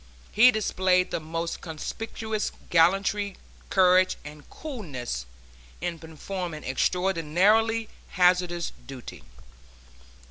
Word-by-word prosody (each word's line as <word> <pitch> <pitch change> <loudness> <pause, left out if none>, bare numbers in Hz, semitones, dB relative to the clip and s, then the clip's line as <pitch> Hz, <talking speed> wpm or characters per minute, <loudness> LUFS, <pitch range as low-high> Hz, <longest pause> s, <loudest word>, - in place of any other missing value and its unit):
He 230 +4 +7
displayed 185 -5 +2
the - - -1
most 165 +1 -4
conspicuous 220 +6 -4 0.2
gallantry, 195 +4 +3 0.3
courage 185 0 +4
and 150 0 -11
coolness, 140 - -6 0.5
in 170 0 -3
performing 160 +1 -6
extraordinarily 190 +9 +2 0.2
hazardous 180 -2 +2 0.2
duty. 135 -3 -9
180 Hz, 80 wpm, -26 LUFS, 160-200 Hz, 0.5 s, He